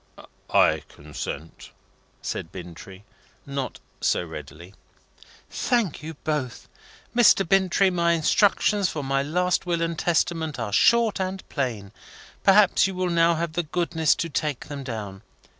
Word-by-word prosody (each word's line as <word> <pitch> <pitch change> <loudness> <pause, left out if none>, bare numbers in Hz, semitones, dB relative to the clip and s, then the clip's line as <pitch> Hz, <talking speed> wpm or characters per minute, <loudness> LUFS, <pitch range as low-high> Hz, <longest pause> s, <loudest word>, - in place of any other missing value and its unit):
"I - - +4
consent," 75 +1 -8 0.5
said 80 - -4
Bintrey, 95 +2 -10 0.4
not 140 -2 -4 0.2
so - - +1
readily. 80 +3 -10 0.7
"Thank 230 - -1
you 160 +1 -7
both. 145 -6 -3 0.5
Mr. 230 -6 +5
Bintrey, 190 +1 +3
my 170 -1 +2
instructions 200 +3 +2
for 150 - -4
my 135 0 0
last 180 +5 0
will 170 -1 0
and 165 -1 -2
testament 165 -2 0
are 110 -4 -4
short 235 - +4
and 190 0 -4
plain. 115 -9 -3 0.5
Perhaps 195 -1 +5
you 190 - -5
will 180 -1 -1
now 170 0 +3
have 165 0 -3
the 175 - 0
goodness 165 -1 +1
to 170 - -3
take 150 -2 -3
them 140 -2 -6
down. 105 -6 -6
160 Hz, 135 wpm, -24 LUFS, 120-180 Hz, 0.7 s, Mr